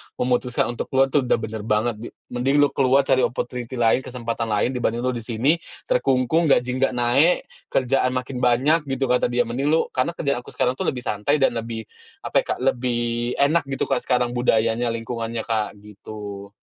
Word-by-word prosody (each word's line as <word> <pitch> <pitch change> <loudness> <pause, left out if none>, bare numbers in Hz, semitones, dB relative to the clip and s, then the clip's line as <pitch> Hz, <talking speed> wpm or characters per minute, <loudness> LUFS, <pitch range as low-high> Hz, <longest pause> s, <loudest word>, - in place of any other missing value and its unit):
memutuskan 125 -1 0
untuk 120 - -5
keluar 135 0 +2
tuh 140 -4 +2
udah - - +4
bener 110 -1 -5
banget 110 +2 +1
di 120 - -7 0.2
mending 125 +3 0
lu 145 - +2
keluar 135 +1 +3
cari 130 -1 +2
opportunity 125 0 -2
lain, 120 0 +3
kesempatan 120 -3 -4
lain 105 +3 +1
dibanding 120 -2 -1
lu 130 - +1
di 120 - -4
sini, 120 +8 +1 0.2
terkungkung, 135 +5 +1
gaji 125 -2 +3
nggak 135 -1 +2
naik, 125 +8 +2 0.2
kerjaan 130 0 +1
makin 130 0 -3
banyak," 140 +6 +2
gitu 135 -1 -1
kata 125 - +3
dia, 120 0 +1
"mending 120 +4 -2
lu" 160 +2 +3
karena 130 +7 -1
kerjaan 140 -6 -1
aku 125 - -13
sekarang 125 +1 0
tuh - - -1
lebih 125 -1 -2
santai 105 +8 0
dan 135 -3 +3
lebih 115 -1 -4 0.4
apa - - +2
ya - - -1
Kak, - - -14
lebih 125 -2 0 0.4
enak 155 +4 +3
gitu 135 -1 -2
Kak 135 -2 0
sekarang, 125 -1 +2
budayanya, 120 -1 +1
lingkungannya 115 0 -3
Kak, 110 -2 -2
gitu. 100 -1 -9
125 Hz, 190 wpm, -23 LUFS, 115-135 Hz, 0.4 s, udah